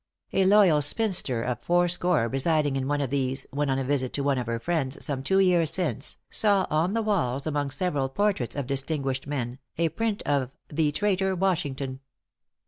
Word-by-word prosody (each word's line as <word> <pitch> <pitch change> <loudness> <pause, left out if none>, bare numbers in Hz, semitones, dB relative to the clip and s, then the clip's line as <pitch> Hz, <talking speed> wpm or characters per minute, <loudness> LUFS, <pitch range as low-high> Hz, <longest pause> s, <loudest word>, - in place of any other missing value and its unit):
A 190 - +3
loyal 190 -6 +5
spinster 145 - +1
of 125 0 -2
four 175 0 +2
score 175 -7 +1
residing 145 +2 +1
in 135 -1 -2
one 145 0 0
of 135 -3 -2
these, 135 -1 -1
when 145 +1 -1
on 135 - +1
a 135 - -1
visit 130 -1 -1
to 140 - -1
one 140 -2 +1
of 120 - -4
her 115 0 -1
friends, 145 +1 -2
some 140 -3 -2
two 190 +8 +1
years 180 -4 +4
since, 180 -4 -2
saw 200 -3 +3
on 165 +7 +1
the 225 - +1
walls, 140 - 0
among 145 -2 -1
several 145 -4 -1
portraits 190 - -1
of 140 -2 -2
distinguished 135 0 -2
men, 130 -3 -3 0.2
a 165 0 +2
print 210 +6 -2
of 140 -2 -1
"the 150 0 +1
traitor 190 +3 0
Washington." 145 -8 -1
145 Hz, 190 wpm, -26 LUFS, 135-180 Hz, 0.2 s, loyal